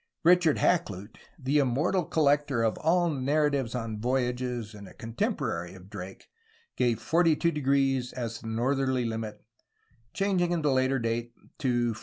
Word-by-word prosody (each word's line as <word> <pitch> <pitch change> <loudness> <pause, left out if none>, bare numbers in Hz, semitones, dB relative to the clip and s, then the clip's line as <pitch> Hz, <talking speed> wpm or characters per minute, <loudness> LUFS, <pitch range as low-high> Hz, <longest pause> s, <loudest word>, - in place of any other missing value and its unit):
Richard 170 -2 +5
Hakluyt, 105 - 0 0.2
the 145 +1 +1
immortal 145 +7 +1
collector 145 -6 +2
of 110 - +1 0.5
narratives 140 -3 +1
on 115 -3 -4
voyages 125 -2 -1
and 100 -2 -10
a - - -14
contemporary 115 - -3
of 95 +2 -15
Drake, 95 -1 -8 0.5
gave 120 -2 +1
42° 140 -6 +2
as 115 -2 -4
the 115 - -8
northerly 130 +2 0
limit, 110 -2 -5 0.7
changing 185 -3 +1
at 165 -3 -1
a 145 - +4
later 130 0 +2
time 115 0 -2 0.3
to 120 -4 +1
43°. - - -11
130 Hz, 135 wpm, -28 LUFS, 115-150 Hz, 0.7 s, Richard